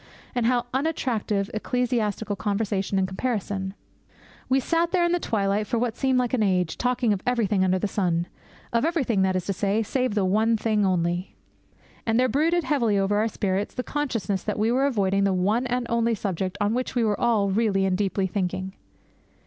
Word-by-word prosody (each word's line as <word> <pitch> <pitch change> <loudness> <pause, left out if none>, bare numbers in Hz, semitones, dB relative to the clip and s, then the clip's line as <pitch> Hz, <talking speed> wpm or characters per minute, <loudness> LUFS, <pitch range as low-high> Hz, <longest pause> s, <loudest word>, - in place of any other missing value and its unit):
And 245 -2 +1
how 245 -1 +2
unattractive 245 -8 -1
ecclesiastical 220 -2 -1
controversy 200 0 -1
in 190 - +2
comparison! 195 -1 -3 0.7
We 265 +1 +4
sat 335 +5 +1
there 360 -2 +3
in 345 - +1
the 350 - +2
twilight 205 -5 0
for 235 - 0
what 230 -1 -1
seemed 265 -1 +1
like 250 -1 0
an 250 - +2
age, 180 -5 +1
talking 245 -3 +1
of 195 - -3
everything 215 -6 +2
under 185 0 +2
the 195 - -1
sun. 175 -4 0 0.5
Of 235 - +2
everything, 275 - +1
that 190 0 +2
is 185 -1 -1
to 195 - -1
say, 205 +3 0
save 250 0 -1
one 215 +4 +2
thing 210 -2 +1
only. 175 0 -1 0.7
And 225 +1 +1
there 255 - +4
brooded 325 +8 +2
heavily 235 -10 +1
over 195 +1 +1
our 215 +2 +2
spirits 200 -2 -2
the 250 - -2
consciousness 225 -9 -2
that 210 - -3
we 220 +2 +2
were 265 +3 +2
avoiding 195 -6 +1
the 195 -1 +2
one 210 +7 +1
and 245 0 -1
only 235 0 +1
subject 190 -1 -3
on 205 +1 +1
which 255 +1 -2
we 240 - +2
were 210 -2 0
all 215 -5 +2
really 195 -2 +2
and 190 -1 +1
deeply 195 0 0
thinking. 190 0 -2
215 Hz, 190 wpm, -25 LUFS, 195-245 Hz, 0.7 s, We